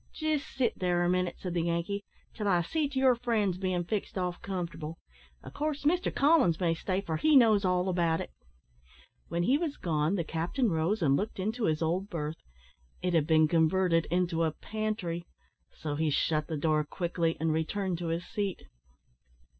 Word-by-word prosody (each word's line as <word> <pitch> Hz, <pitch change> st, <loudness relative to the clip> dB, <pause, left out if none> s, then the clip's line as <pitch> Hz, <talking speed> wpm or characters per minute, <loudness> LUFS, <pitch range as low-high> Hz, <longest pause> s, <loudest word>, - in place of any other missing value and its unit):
"Jist 310 Hz, -2 st, -1 dB
sit 250 Hz, -3 st, 0 dB
there 175 Hz, -1 st, +1 dB
a 175 Hz, -, +2 dB
minute," 180 Hz, -1 st, 0 dB
said 180 Hz, -2 st, -5 dB
the 175 Hz, -, +1 dB
Yankee, 170 Hz, +4 st, -1 dB, 0.3 s
"till 210 Hz, -2 st, -3 dB
I 175 Hz, -3 st, +3 dB
see 300 Hz, -, -1 dB
to 275 Hz, -, -6 dB
your 260 Hz, -1 st, +5 dB
friends 220 Hz, -6 st, 0 dB
bein' 185 Hz, -2 st, 0 dB
fixed 200 Hz, +3 st, -3 dB
off 180 Hz, -1 st, -2 dB
comfortable; 170 Hz, -4 st, -5 dB, 0.5 s
of -, -, -10 dB
course, 300 Hz, -1 st, -2 dB
Mr 350 Hz, +5 st, +2 dB
Collins 280 Hz, -, +4 dB
may 170 Hz, -3 st, +2 dB
stay, 185 Hz, +3 st, -2 dB
for 160 Hz, -5 st, -3 dB
he 310 Hz, -, +3 dB
knows 220 Hz, -6 st, +6 dB
all 180 Hz, 0 st, +1 dB
about 170 Hz, -3 st, +1 dB
it." -, -, -6 dB, 1.0 s
When 170 Hz, +1 st, -1 dB
he 265 Hz, +9 st, +3 dB
was 320 Hz, -4 st, -2 dB
gone, 155 Hz, +1 st, 0 dB
the 175 Hz, -, 0 dB
captain 175 Hz, -, -1 dB
rose 170 Hz, +5 st, 0 dB
and 140 Hz, -3 st, +4 dB
looked 210 Hz, +8 st, -2 dB
into 220 Hz, +4 st, -1 dB
his 155 Hz, 0 st, +1 dB
old 180 Hz, +5 st, -1 dB
berth. 155 Hz, -3 st, -4 dB, 0.6 s
It 180 Hz, -1 st, 0 dB
had 160 Hz, -3 st, +2 dB
been 155 Hz, -1 st, +5 dB
converted 165 Hz, +1 st, +2 dB
into 175 Hz, -1 st, +1 dB
a 160 Hz, -2 st, 0 dB
pantry, 210 Hz, -6 st, -3 dB, 0.4 s
so 150 Hz, -2 st, -5 dB
he 155 Hz, +1 st, 0 dB
shut 155 Hz, +1 st, +1 dB
the 160 Hz, -, -3 dB
door 155 Hz, 0 st, +2 dB
quickly 170 Hz, +1 st, -1 dB
and 160 Hz, 0 st, +1 dB
returned 175 Hz, +3 st, -1 dB
to 175 Hz, -, -3 dB
his 165 Hz, +2 st, -2 dB
seat. 200 Hz, -2 st, -3 dB
180 Hz, 185 wpm, -30 LUFS, 165-210 Hz, 1.0 s, knows